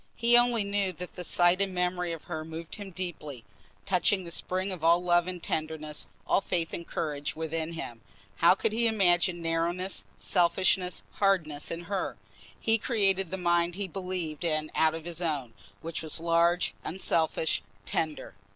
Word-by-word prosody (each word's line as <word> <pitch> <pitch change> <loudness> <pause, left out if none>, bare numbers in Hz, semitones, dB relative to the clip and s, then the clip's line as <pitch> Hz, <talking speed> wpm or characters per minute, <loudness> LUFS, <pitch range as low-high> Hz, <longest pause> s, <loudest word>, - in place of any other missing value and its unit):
He 235 +1 +4
only 240 -2 +4
knew 200 -1 0
that 180 +2 -7
the 180 - -6
sight 175 +2 +4
and 195 -2 0
memory 180 -1 0
of 165 -2 -6
her 155 -2 -4
moved 160 +3 -7
him 205 -2 -7
deeply, 160 - -6 0.4
touching 190 0 +2
the 170 - -8
spring 185 +3 -1
of 180 -4 -6
all 170 +2 +5
love 175 0 +3
and 180 -2 -5
tenderness, 155 -1 -3 0.2
all - - +3
faith 170 -4 -2
and 170 - -5
courage 145 -2 -3
within 160 +1 -3
him. 120 -8 -6 0.4
How 170 +2 +6
could 215 +2 0
he 230 +1 +3
imagine 175 -4 +2
narrowness, 170 +3 -1
selfishness, 180 0 +2
hardness 170 -8 +1
in 165 - -4
her? 190 +2 -3 0.4
He 225 0 +2
created 195 -6 +1
the 190 - -3
mind 175 -1 +2
he 200 0 -3
believed 180 -4 -4
in 155 -2 0
out 160 0 +3
of 165 0 -7
his 175 0 -4
own, 145 -8 -2 0.3
which 165 0 -4
was 160 0 +1
large, 170 +1 +2
unselfish, 160 -3 0 0.2
tender. 155 -2 -1
175 Hz, 170 wpm, -29 LUFS, 160-190 Hz, 0.4 s, How